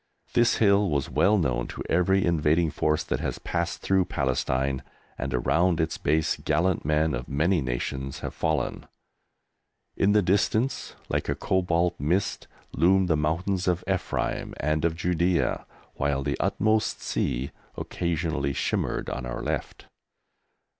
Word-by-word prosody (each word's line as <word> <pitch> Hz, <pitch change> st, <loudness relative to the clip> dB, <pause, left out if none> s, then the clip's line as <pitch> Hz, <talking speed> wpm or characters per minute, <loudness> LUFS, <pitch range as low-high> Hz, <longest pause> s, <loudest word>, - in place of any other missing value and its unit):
This 120 Hz, 0 st, +4 dB
hill 100 Hz, -2 st, +4 dB
was 70 Hz, -3 st, -1 dB
well 105 Hz, +2 st, +4 dB
known 60 Hz, -9 st, 0 dB
to -, -, -6 dB
every 95 Hz, +2 st, +2 dB
invading 80 Hz, 0 st, +2 dB
force 75 Hz, +2 st, 0 dB
that -, -, -2 dB
has -, -, -3 dB
passed 85 Hz, 0 st, -3 dB
through 95 Hz, -1 st, +3 dB
Palestine, 65 Hz, -1 st, -1 dB, 0.3 s
and 70 Hz, +3 st, -4 dB
around 85 Hz, +7 st, +2 dB
its 80 Hz, 0 st, -1 dB
base 80 Hz, +2 st, +1 dB
gallant 85 Hz, +4 st, +1 dB
men 75 Hz, +1 st, +1 dB
of 60 Hz, -1 st, -4 dB
many 80 Hz, +5 st, +2 dB
nations 65 Hz, +1 st, -3 dB
have -, -, -4 dB
fallen. 75 Hz, -5 st, -1 dB, 1.1 s
In 100 Hz, +1 st, +3 dB
the 105 Hz, -1 st, +4 dB
distance, 110 Hz, +7 st, 0 dB
like -, -, -2 dB
a -, -, +1 dB
cobalt 90 Hz, -2 st, 0 dB
mist, 90 Hz, +8 st, -1 dB, 0.2 s
loomed 95 Hz, +2 st, +3 dB
the 80 Hz, -, +4 dB
mountains 90 Hz, +5 st, -1 dB
of 90 Hz, 0 st, +1 dB
Ephraim 95 Hz, -2 st, -2 dB
and 75 Hz, +2 st, 0 dB
of 80 Hz, -1 st, +1 dB
Judæa, 90 Hz, 0 st, 0 dB, 0.3 s
while 70 Hz, -1 st, -1 dB
the 70 Hz, +1 st, -1 dB
"utmost 110 Hz, +1 st, +1 dB
sea" 65 Hz, +3 st, -1 dB, 0.3 s
occasionally 80 Hz, -5 st, -2 dB
shimmered -, -, -1 dB
on 60 Hz, -1 st, -4 dB
our -, -, -4 dB
left. -, -, -4 dB
80 Hz, 140 wpm, -26 LUFS, 70-95 Hz, 1.1 s, This